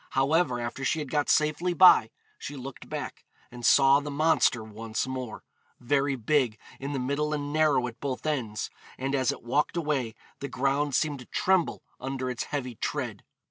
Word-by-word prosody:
However, 135 -2 +2
after 120 +3 -4
she 135 - +1
had 150 -4 -5
got 145 -1 +1
safely 155 +4 +2
by 175 -11 +7 0.3
she 145 - -6
looked 135 0 -9
back, - - -5 0.3
and 120 0 -10
saw 135 +2 +6
the 145 0 -6
monster 145 -5 +2
once 110 +1 -4
more, 130 -3 -5 0.4
'very 140 +2 +1
big 125 -2 +1 0.2
in 140 +2 -4
the - - -1
middle 140 +4 -1
and 145 0 -4
narrow 155 -5 +3
at 120 -1 -7
both 135 -1 -4
ends,' 125 -9 -2 0.3
and 135 +1 -2
as 130 -3 +2
it - - -9
walked 145 +7 0
away 140 -8 -1 0.2
the 140 - -4
ground 140 +2 0
seemed 150 -3 0
to 125 - -10
tremble 185 -3 +1 0.2
under 130 0 -3
its 125 - -4
heavy 130 -4 -4
tread. - - -3
135 Hz, 180 wpm, -28 LUFS, 125-150 Hz, 0.4 s, by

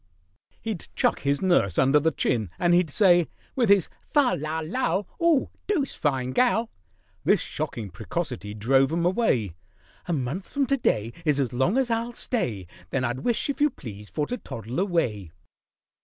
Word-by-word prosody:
He'd 220 -6 -4
chuck - - +2
his 140 +3 0
nurse 175 - +3
under 135 +3 +5
the 160 +2 +2
chin, 120 - 0
and 175 0 +3
he'd 175 -2 +3
say, 175 0 +4 0.3
With 240 -5 +2
his 200 -3 +5 0.2
"Fal, 285 -4 +3
lal, 155 +2 -3
lal"— 200 0 -1
"'Oo 335 -5 +3 0.2
doosed 320 -10 0
fine 130 -4 0
gal!" 235 - +2 0.5
This - - +4
shocking 105 -5 -4
precocity 105 +4 -4
drove 135 +6 +3
'em 170 +1 0
away: 155 - +1 0.5
"A 175 - 0
month 145 +6 -3
from 280 -1 0
to 275 +1 +1
day 115 - 0
Is 150 -3 +2
as 130 -3 0
long 130 - +2
as 260 -3 +1
I'll 230 +1 -1
stay— 120 - -2 0.2
Then 135 - -1
I'd 120 0 -1
wish, 235 - 0
if 280 0 -3
you 295 - +5
please, 105 - -10
for 150 - -1
to 245 - -4
toddle 115 +6 -5
away." 120 - -1
160 Hz, 170 wpm, -26 LUFS, -, 0.5 s, under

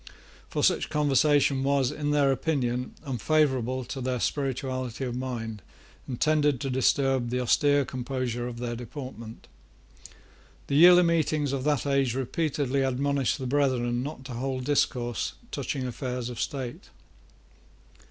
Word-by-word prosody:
For - - -2
such - - +2
conversation 145 -2 +3
was, 135 -2 +2
in 145 -1 -3
their 145 -2 +3
opinion, 125 -4 -1
unfavourable 130 -1 +1
to 135 +2 -6
their 125 0 -1
spirituality 130 -2 -2
of 125 -2 -3
mind, 115 -4 -4 0.5
and 125 -3 -5
tended 150 -3 +2
to 135 -2 -2
disturb 130 -1 +2
the 125 +1 -1
austere 145 +3 +3
composure 125 -1 -3
of 120 -1 -6
their 120 0 -3
deportment. 120 -2 -8 1.2
The 140 - -2
yearly 175 +3 +8
meetings 155 -4 +1
of 135 -1 -2
that 145 -4 +1
age 135 -3 +1
repeatedly 140 0 -1
admonished 135 0 0
the 130 - -5
brethren 125 -3 +1
not 135 -1 -6
to 130 - -7
hold 130 +1 -3
discourse 120 - 0 0.2
touching 130 -2 -3
affairs 125 -1 -4
of 120 - -5
state. 130 - -5
130 Hz, 135 wpm, -27 LUFS, 125-145 Hz, 1.2 s, yearly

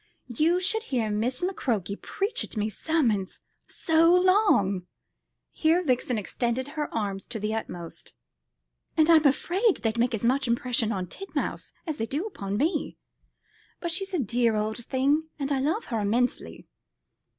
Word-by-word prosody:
You 330 +8 +3
should 440 +4 +2
hear 235 - -1
Miss 240 +8 -1
McCroke 225 - -2
preach 400 +4 -1
at - - -8
me 210 +1 0
sermons 220 - 0 0.3
so 325 +1 +3
long" 360 - +3 0.6
here 330 +3 +2
Vixen 250 -4 0
extended 240 +5 -2
her 300 0 -4
arms 200 -3 -3
to 230 - -5
the 210 +1 -2
utmost 175 -6 -5 0.8
"and 315 -1 +5
I'm 315 -3 +6
afraid 370 - +2
they'd 225 0 -2
make 240 0 +2
as 220 - -6
much 260 +3 +2
impression 235 -1 +1
on 190 -4 -2
Titmouse 390 - -5
as 315 -4 -3
they 225 - -2
do 295 - -2
upon 200 - -4
me. 310 - -1 0.8
But 340 - -2
she's 385 +3 0
a - - +1
dear 235 -1 +1
old 215 +2 -2
thing, 285 +4 +1
and 280 -1 -3
I 275 - +2
love 320 - 0
her 230 -3 -2
immensely." 230 +5 -1
255 Hz, 155 wpm, -27 LUFS, 220-320 Hz, 0.8 s, I'm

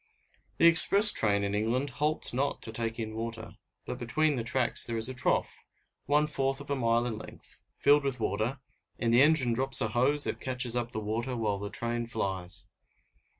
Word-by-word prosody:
The - - +3
express 200 +5 +7
train 100 -2 0
in 100 0 -3
England 120 +7 -1
halts 150 +2 +2
not 140 +3 -2
to 110 - -5
take 115 0 -4
in 110 -2 -5
water, 115 0 -6 0.3
but 125 - -6
between 150 +5 0
the 120 - -3
tracks 120 +1 +3
there 115 -1 -1
is 110 +1 +5
a 130 - -4
trough, 125 - -2 0.4
one 150 +2 +2
fourth 135 -2 -2
of 145 0 -9
a - - +1
mile 115 -2 0
in 110 -3 -5
length, - - -12 0.2
filled 145 +1 +3
with 135 -3 -3
water; 110 +5 -2 0.4
and 115 -1 -1
the 120 - +5
engine 140 -5 +3
drops 135 +1 +1
a 110 - 0
hose 135 +6 +1
that - - -3
catches 125 -2 -3
up 120 -1 -3
the 110 - -5
water 115 +4 -4
while 105 -3 -2
the 100 0 -6
train 120 +3 -4
flies. 95 -5 -5
120 Hz, 195 wpm, -28 LUFS, 110-135 Hz, 0.4 s, express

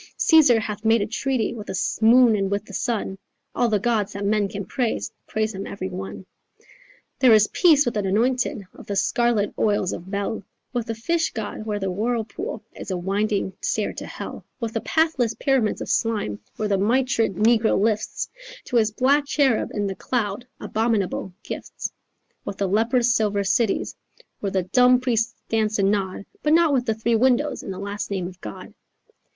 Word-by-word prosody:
Caesar 295 -8 +6
hath 210 -1 -5
made 225 +1 +4
a 205 - 0
treaty 245 0 -1
With 215 -3 -8
the 190 - -2 0.2
moon 235 0 +6
and 195 -2 0
with 200 +1 -2
the - - -12
sun, 210 -5 -2 0.3
All 240 - +1
the 215 - +3
gods 215 -1 0
that 200 0 -4
men 205 0 +2
can 200 -1 -6
praise 240 +3 -2 0.2
Praise 220 0 -1
him 195 +1 -5
every 145 - -5
one. 95 - -7 0.9
There 250 -4 +7
is 215 -1 +6
peace 310 -5 +5
with 240 - 0
the 215 - -1
anointed 220 +3 0
Of - - -13
the 200 - -2
scarlet 230 -1 +1
oils 205 -3 +1
of 175 +2 -8
Bel, 200 +2 -2 0.3
With 240 -2 -2
the 225 - -3
Fish 330 +9 0
God, 215 0 -5
where 210 -1 -1
the 195 -2 -2
whirlpool 235 - -3
Is - - -8
a 185 - -1
winding 195 +2 -1
stair - - -1
to - - -7
hell, - - -7 0.2
With 230 -3 -3
the 225 - -1
pathless 315 -8 +1
pyramids 265 -6 +1
of - - -4
slime, 210 - 0 0.2
Where 215 - -2
the 200 -2 +1
mitred 230 -1 +1
negro 220 +2 +3
lifts 215 +1 0 0.4
To 245 - 0
his 220 -2 +3
black 275 +6 +2
cherub 275 -6 +2
in 205 -1 -2
the 195 - -2
cloud 220 +1 -2
Abominable 215 -4 -1
gifts, - - -6 0.5
With 195 - -6
the 200 - 0
leprous 235 +4 +2
silver 210 -3 +1
cities 205 +2 +1 0.4
Where 200 - -2
the 190 -1 0
dumb 250 +6 +4
priests 235 -2 0
dance 220 -1 +1
and 195 -1 +3
nod, 200 -1 -2 0.2
But 300 - +2
not 330 -2 +5
with 250 -2 +1
the 220 - +1
three 230 +1 +1
windows 260 +5 +2
And - - -6
the 185 - -6
last 200 +1 -4
name 190 -3 -2
of 180 0 -9
God. 105 - -9
220 Hz, 190 wpm, -23 LUFS, 200-240 Hz, 0.9 s, There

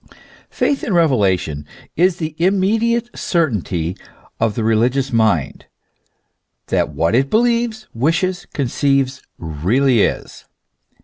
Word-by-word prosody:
Faith 280 - -1
in 200 - -1
revelation 95 - +1 0.3
is 180 +2 +3
the 155 -2 -4
immediate 220 +6 +1
certainty 100 - -1 0.4
of 110 -2 0
the 115 - -2
religious 120 +4 +1
mind, 110 -10 0 1.0
that - - +1
what 85 +4 0
it 135 +3 +2
believes, 230 0 +1
wishes, 175 - 0
conceives, 135 0 0 0.2
really 105 - +1
is. - - -2
135 Hz, 105 wpm, -18 LUFS, -, 1.0 s, is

